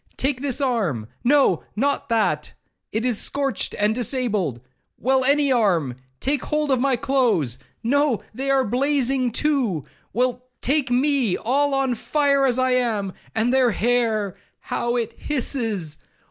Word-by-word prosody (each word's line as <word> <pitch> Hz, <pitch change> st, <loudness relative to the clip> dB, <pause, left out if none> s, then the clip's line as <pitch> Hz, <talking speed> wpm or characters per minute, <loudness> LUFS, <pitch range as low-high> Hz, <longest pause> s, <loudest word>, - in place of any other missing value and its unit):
—Take 265 Hz, -1 st, -1 dB
this 275 Hz, -2 st, 0 dB
arm—no, 230 Hz, -, +1 dB
not 280 Hz, +5 st, 0 dB
that, 225 Hz, -2 st, 0 dB, 0.4 s
it 225 Hz, +3 st, -1 dB
is 245 Hz, -4 st, +1 dB
scorched 275 Hz, -2 st, -1 dB
and 210 Hz, +1 st, +2 dB
disabled—well, 225 Hz, -, -2 dB
any 280 Hz, +1 st, +3 dB
arm—take 165 Hz, -, 0 dB
hold 300 Hz, -1 st, 0 dB
of 255 Hz, -2 st, +2 dB
my 270 Hz, -1 st, +3 dB
clothes—no, 235 Hz, -, 0 dB
they 270 Hz, +4 st, -3 dB
are 270 Hz, -1 st, +3 dB
blazing 260 Hz, +1 st, +1 dB
too!—Well, 250 Hz, -, -1 dB, 0.2 s
take 280 Hz, -1 st, +1 dB
me 255 Hz, -4 st, +2 dB
all 275 Hz, +4 st, +1 dB
on 270 Hz, -2 st, +1 dB
fire 280 Hz, +2 st, +2 dB
as 250 Hz, -1 st, +1 dB
I 255 Hz, 0 st, +2 dB
am!—And 225 Hz, -1 st, -1 dB
their 260 Hz, -2 st, +4 dB
hair, 220 Hz, -3 st, +1 dB, 0.3 s
how 240 Hz, 0 st, -2 dB
it 230 Hz, -2 st, -2 dB
hisses! 225 Hz, -, -2 dB
245 Hz, 120 wpm, -23 LUFS, 215-275 Hz, 0.4 s, their